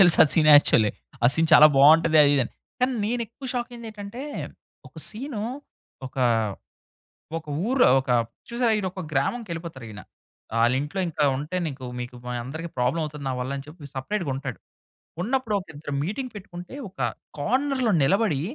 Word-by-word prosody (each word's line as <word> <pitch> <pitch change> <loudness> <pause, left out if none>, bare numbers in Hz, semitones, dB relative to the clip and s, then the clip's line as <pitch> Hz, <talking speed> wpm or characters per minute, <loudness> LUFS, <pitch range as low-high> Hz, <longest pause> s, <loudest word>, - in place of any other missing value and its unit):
తెలుసు 175 -4 +6
ఆ - - +2
scene 155 -2 +4
actually. 110 -7 +4 0.3
ఆ - - +9
సీన్ 160 +1 +1
చాలా 155 0 +10
బావుంటది 155 +3 +6
అదిదని. 140 -4 +3 0.3
కానీ 255 +1 +2
నేను 240 +3 -1
ఎక్కువ 250 +5 -11
షాక్ 240 -1 -2
అయ్యింది 235 -2 -8
ఏంటంటే, 210 +4 -8 0.7
ఒక - - -34
సీను, 230 -1 -5 0.6
ఒక 130 - -13 1.2
ఒక 160 - -15 0.2
ఊరు 260 0 +4 0.2
ఒక 130 - -6 0.4
చూసారా? 235 0 +1
ఈయన 200 - -2
ఒక 185 - -7
గ్రామంకి 200 - -1
వెళ్ళిపోతారు 165 -6 -7
ఈయన. 105 0 -9 0.6
ఆళ్ళ 120 +2 +4
ఇంట్లో 155 +7 -4
ఇంట 165 - -8 0.2
ఉంటే 150 +6 -4
నీకు 135 -4 -6 0.2
మీకు 125 0 -7
మా 125 - -3
అందరికి 160 +6 -6
ప్రాబ్లమ్ 125 +6 +1
అవుతుంది 150 -1 -7
నా - - -1
వల్లని 135 +2 -4
చెప్పి 150 -1 -11
సెపరేట్‌గా 170 +4 -2
ఉంటాడు. 130 -3 -5 0.6
ఉన్నప్పుడు 240 +2 -1
ఒక 185 - -12
ఇద్దరు 145 0 -7
మీటింగ్ 245 - -4
పెట్టుకుంటే 180 +1 -9
ఒక 185 - -24 0.4
కార్నర్‌లో 255 - +1
నిలబడి 185 -2 +2
165 Hz, 160 wpm, -25 LUFS, 140-225 Hz, 1.2 s, చాలా